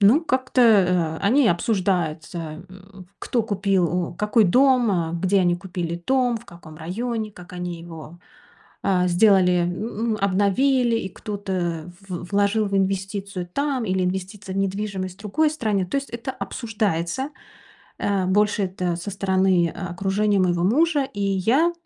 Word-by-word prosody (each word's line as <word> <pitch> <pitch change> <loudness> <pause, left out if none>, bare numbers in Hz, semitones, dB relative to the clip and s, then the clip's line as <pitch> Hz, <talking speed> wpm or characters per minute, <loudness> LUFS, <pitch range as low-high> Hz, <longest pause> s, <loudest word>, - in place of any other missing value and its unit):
ну, 220 +10 +6
как-то, 260 -4 0
э, 180 -7 +4
они 255 +2 +4
обсуждаются: 175 -4 -1
м, 190 -1 -14
кто 235 -3 -1
купил, 195 -4 +1 0.2
м, - - -11
какой 210 +3 +3
дом, 250 +3 +4
э, 165 -2 -1
где 190 +3 +2
они 175 -1 +2
купили 175 -2 -5
дом, 255 -2 +2
в 225 - -10
каком 165 -3 -13
районе, 215 +6 -4
как 180 -1 -13
они 175 -1 -5
его, 165 0 -11 0.6
э, 180 -2 +2
сделали, 180 -1 +4
м, 215 +5 -2
обновили, 230 +6 +2
и 190 - -3
кто-то 185 -5 -4 0.2
в 180 -1 -5
вложил 205 +2 +2
в 195 - -1
инвестицию 195 -1 -2
там 280 -2 -1
или 185 -2 0
инвестиции 190 +1 -4
в 190 - -5
недвижимость 195 -1 -2
в - - -21
другой 300 +10 +1
стране. 215 -11 -1
То 275 - -2
есть 275 0 -3
это 235 +3 -5
обсуждается. 220 - -2 0.7
Э, 195 -2 0
больше 205 +2 +2
это 180 -2 -2
со 180 +4 -6
стороны, 190 -2 +2
э, - - -5 0.2
окружения 195 +3 +1
моего 175 -2 +1
мужа. 295 - +3
И 205 - -4
я 220 - +2
195 Hz, 150 wpm, -23 LUFS, 180-220 Hz, 0.7 s, ну